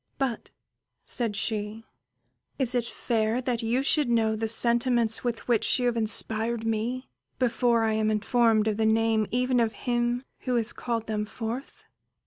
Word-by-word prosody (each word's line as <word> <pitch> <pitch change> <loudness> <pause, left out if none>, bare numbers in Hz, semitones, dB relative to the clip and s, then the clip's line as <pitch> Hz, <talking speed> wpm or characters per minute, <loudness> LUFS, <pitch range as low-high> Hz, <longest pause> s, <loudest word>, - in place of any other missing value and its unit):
"But," 265 -4 -3 0.5
said 230 -4 -1
she, 215 +1 -3 0.7
"is 260 -3 0
it 240 -2 0
fair 225 -1 -1
that 250 -2 -2
you 235 +4 0
should 295 -2 +2
know 225 -2 +2
the 225 +1 -2
sentiments 235 0 +3
with 240 -2 -3
which 235 -3 +3
you 250 - -1
have 240 -1 +1
inspired 225 +1 +1
me 230 +4 -2 0.3
before 240 -2 +1
I 220 -1 +1
am 215 0 +1
informed 220 0 +2
of 215 -1 0
the 220 -1 +2
name 220 -1 +2
even 250 +1 +1
of 225 -1 +1
him 240 0 0 0.2
who 250 -1 -2
has 235 -1 0
called 230 -2 -3
them 215 -1 -2
forth?" 230 +5 -7
230 Hz, 160 wpm, -26 LUFS, 220-245 Hz, 0.7 s, sentiments